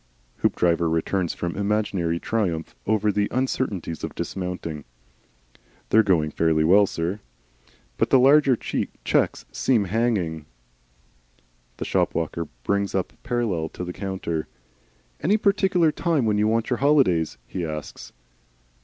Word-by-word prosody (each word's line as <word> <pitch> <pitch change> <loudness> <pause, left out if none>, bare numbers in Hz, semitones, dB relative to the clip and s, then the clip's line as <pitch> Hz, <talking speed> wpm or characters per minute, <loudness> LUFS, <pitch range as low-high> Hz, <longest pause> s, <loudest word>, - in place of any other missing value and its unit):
Hoopdriver 85 -1 +1
returns 85 +2 -1
from 85 -1 -3
an 100 - -4
imaginary 100 -5 0
triumph 90 -8 -2
over 105 0 +2
the 105 0 +1
uncertainties 115 - -2
of - - -5
dismounting. 90 -5 -4 1.1
"They're 110 - +6
going 85 -7 +2
fairly 80 -1 +2
well, 100 +5 +5
sir. 85 +5 -3 0.8
But - - +1
the - - +6
larger 135 +1 +5
checks - - -1
seem 115 - +2
hanging." 95 -8 -1 1.3
The - - -4
shop - - 0
walker 85 0 -2 0.2
brings 100 -1 0
up 95 - -1
parallel 115 -10 -1
to - - -7
the 90 0 -5
counter. 95 -5 -3 0.7
"Any 200 +7 +2
particular 195 -5 +3
time 160 -6 0
when 105 -1 +1
you 105 - +3
want 115 +2 0
your 125 - +2
holidays?" 130 - +2
he 90 - -5
asks. 75 -2 -6
100 Hz, 130 wpm, -24 LUFS, 85-120 Hz, 1.3 s, They're